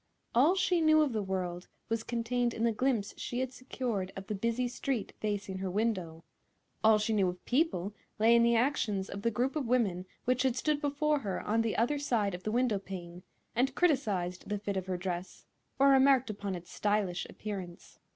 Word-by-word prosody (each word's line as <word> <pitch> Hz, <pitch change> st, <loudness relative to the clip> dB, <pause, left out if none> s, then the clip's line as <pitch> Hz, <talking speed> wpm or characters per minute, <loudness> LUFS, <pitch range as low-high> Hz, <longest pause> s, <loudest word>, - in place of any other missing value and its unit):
All 285 Hz, +10 st, +5 dB
she 365 Hz, -2 st, +2 dB
knew 310 Hz, -1 st, +6 dB
of 280 Hz, -5 st, -1 dB
the 215 Hz, -, 0 dB
world 185 Hz, -2 st, -3 dB, 0.2 s
was 225 Hz, 0 st, -1 dB
contained 240 Hz, +1 st, -1 dB
in 225 Hz, -, -2 dB
the 235 Hz, -, +3 dB
glimpse 225 Hz, -3 st, 0 dB
she 245 Hz, -, -3 dB
had 260 Hz, 0 st, -2 dB
secured 240 Hz, -7 st, -3 dB
of 195 Hz, -, -7 dB
the 210 Hz, -, -3 dB
busy 230 Hz, +4 st, 0 dB
street 245 Hz, -2 st, -3 dB
facing 205 Hz, -3 st, -3 dB
her 190 Hz, 0 st, -2 dB
window; 185 Hz, -6 st, -1 dB, 0.6 s
all 220 Hz, 0 st, +7 dB
she 215 Hz, +1 st, 0 dB
knew 195 Hz, -4 st, +3 dB
of 180 Hz, 0 st, -8 dB
people 245 Hz, -, +1 dB, 0.2 s
lay 225 Hz, +2 st, +5 dB
in 235 Hz, -, +6 dB
the 235 Hz, 0 st, +4 dB
actions 225 Hz, -6 st, 0 dB
of 200 Hz, -, -5 dB
the 230 Hz, -, +2 dB
group 245 Hz, +5 st, -1 dB
of 290 Hz, -5 st, -1 dB
women 200 Hz, -7 st, +1 dB, 0.2 s
which 255 Hz, 0 st, +2 dB
had 260 Hz, -2 st, +2 dB
stood 295 Hz, +2 st, 0 dB
before 295 Hz, +1 st, +1 dB
her 200 Hz, -7 st, -3 dB
on 225 Hz, +2 st, +1 dB
the 225 Hz, -1 st, -1 dB
other 265 Hz, +6 st, +1 dB
side 225 Hz, -8 st, 0 dB
of 180 Hz, -, -5 dB
the 215 Hz, -, -3 dB
window 240 Hz, -3 st, +2 dB
pane 180 Hz, -2 st, -8 dB, 0.3 s
and 260 Hz, +3 st, +1 dB
criticised 205 Hz, -, 0 dB
the 205 Hz, -, 0 dB
fit 200 Hz, 0 st, -3 dB
of 190 Hz, -1 st, -3 dB
her 185 Hz, -1 st, -1 dB
dress 180 Hz, 0 st, -5 dB, 0.3 s
or 275 Hz, +1 st, +5 dB
remarked 265 Hz, -3 st, +5 dB
upon 200 Hz, -2 st, -4 dB
its 175 Hz, 0 st, -9 dB
stylish 205 Hz, -4 st, 0 dB
appearance. 190 Hz, -5 st, -7 dB
220 Hz, 200 wpm, -31 LUFS, 195-255 Hz, 0.6 s, all